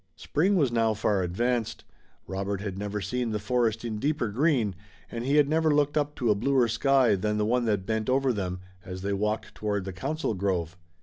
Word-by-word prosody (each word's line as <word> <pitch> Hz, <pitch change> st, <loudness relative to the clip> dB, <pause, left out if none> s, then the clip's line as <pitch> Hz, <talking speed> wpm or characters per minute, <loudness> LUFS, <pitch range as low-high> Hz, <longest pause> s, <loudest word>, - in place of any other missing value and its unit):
Spring 185 Hz, +7 st, +1 dB
was 145 Hz, -9 st, +2 dB
now 115 Hz, -2 st, +2 dB
far 105 Hz, -2 st, +1 dB
advanced. 115 Hz, +5 st, -1 dB, 0.4 s
Robert 100 Hz, +1 st, -3 dB
had 100 Hz, -2 st, -4 dB
never 105 Hz, +1 st, -3 dB
seen 120 Hz, +5 st, -2 dB
the 110 Hz, -, -1 dB
forest 115 Hz, +1 st, 0 dB
in 110 Hz, -2 st, -3 dB
deeper 145 Hz, -3 st, 0 dB
green 120 Hz, -, +1 dB, 0.4 s
and 115 Hz, 0 st, -4 dB
he 140 Hz, +2 st, +2 dB
had 150 Hz, -2 st, +5 dB
never 160 Hz, +1 st, +2 dB
looked 145 Hz, 0 st, +2 dB
up 150 Hz, -1 st, 0 dB
to 120 Hz, -4 st, +1 dB
a -, -, +6 dB
bluer 125 Hz, +4 st, +2 dB
sky 130 Hz, 0 st, +3 dB
than 105 Hz, +2 st, 0 dB
the 105 Hz, -, +1 dB
one 120 Hz, +2 st, +1 dB
that 105 Hz, -4 st, 0 dB
bent 110 Hz, +2 st, -1 dB
over 135 Hz, 0 st, +2 dB
them, 90 Hz, -3 st, -3 dB, 0.2 s
as 95 Hz, 0 st, -7 dB
they 100 Hz, 0 st, -1 dB
walked 105 Hz, +2 st, -2 dB
toward 105 Hz, -2 st, -2 dB
the 95 Hz, -, -5 dB
council 155 Hz, -, -2 dB
grove. 90 Hz, -4 st, -1 dB
110 Hz, 205 wpm, -27 LUFS, 100-130 Hz, 0.4 s, a